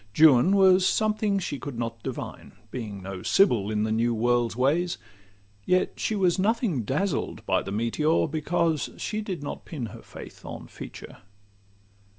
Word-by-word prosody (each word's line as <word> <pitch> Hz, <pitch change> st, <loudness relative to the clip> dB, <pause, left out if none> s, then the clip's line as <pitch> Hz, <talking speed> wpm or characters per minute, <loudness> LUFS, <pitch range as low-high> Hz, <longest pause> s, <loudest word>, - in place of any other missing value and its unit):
Juan 155 Hz, +4 st, +6 dB
was 190 Hz, -1 st, +6 dB
something 215 Hz, 0 st, +1 dB
she 155 Hz, -7 st, -3 dB
could 135 Hz, -2 st, -6 dB
not 115 Hz, -1 st, -4 dB
divine, -, -, -6 dB, 0.2 s
Being 105 Hz, -6 st, -6 dB
no 95 Hz, -1 st, -6 dB
sibyl 120 Hz, -, +3 dB
in 105 Hz, -1 st, 0 dB
the 110 Hz, -, -1 dB
new 115 Hz, +1 st, +1 dB
world's 120 Hz, 0 st, +1 dB
ways; 155 Hz, +8 st, +1 dB, 0.7 s
Yet 185 Hz, -, +1 dB
she 220 Hz, -, 0 dB
was 185 Hz, -2 st, +2 dB
nothing 210 Hz, -, +1 dB
dazzled 145 Hz, -, -2 dB
by -, -, +2 dB
the 100 Hz, -, -6 dB
meteor, 115 Hz, +10 st, +1 dB
Because 160 Hz, 0 st, 0 dB
she 215 Hz, 0 st, -3 dB
did 185 Hz, -8 st, -5 dB
not 145 Hz, -, -6 dB
pin 140 Hz, -8 st, -5 dB
her -, -, -10 dB
faith -, -, -12 dB
on -, -, -8 dB
feature. -, -, -10 dB
150 Hz, 160 wpm, -26 LUFS, 115-185 Hz, 0.7 s, Juan